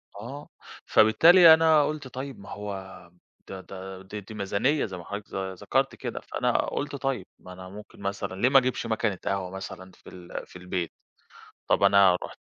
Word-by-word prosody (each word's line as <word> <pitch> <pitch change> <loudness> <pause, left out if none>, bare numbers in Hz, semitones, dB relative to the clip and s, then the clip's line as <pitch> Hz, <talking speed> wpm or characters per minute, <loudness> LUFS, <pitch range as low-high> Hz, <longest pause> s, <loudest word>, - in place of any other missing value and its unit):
آه، 125 +8 -8 0.4
فبالتالي 165 - +7
أنا 160 -2 +5
قُلت 150 -3 -4
طيب 130 -2 -7
ما 100 - -12
هو 95 -4 -8 0.4
ده 95 -1 -7
ده 95 0 -9
دي 105 +2 -8
دي 110 +3 -11
ميزانية 105 +8 0
زي 95 -3 -7
ما 85 - -9
حضرتِك 100 0 -7
ذ 95 0 -3
ذكرتِ 90 - -1
كده، - - -5
فأنا - - -1
قُلت 145 0 -4
طيب 135 -8 -2
ما 90 - -11
أنا 90 0 -10
ممكن 105 +2 -12
مثلًا 100 -1 -4
ليه 125 - +5
ما 135 - +6
اجِيبش 130 -1 -2
مكنة 110 -3 -1
قهوة 95 -2 -2
مثلًا 95 -1 -8
في - - -16
ال 90 -1 -9
في - - -18
البيت؟ 90 -1 -4 0.7
طب - - +2
أنا 100 -2 +6
رُحت - - -10
100 Hz, 180 wpm, -26 LUFS, 95-130 Hz, 0.7 s, فبالتالي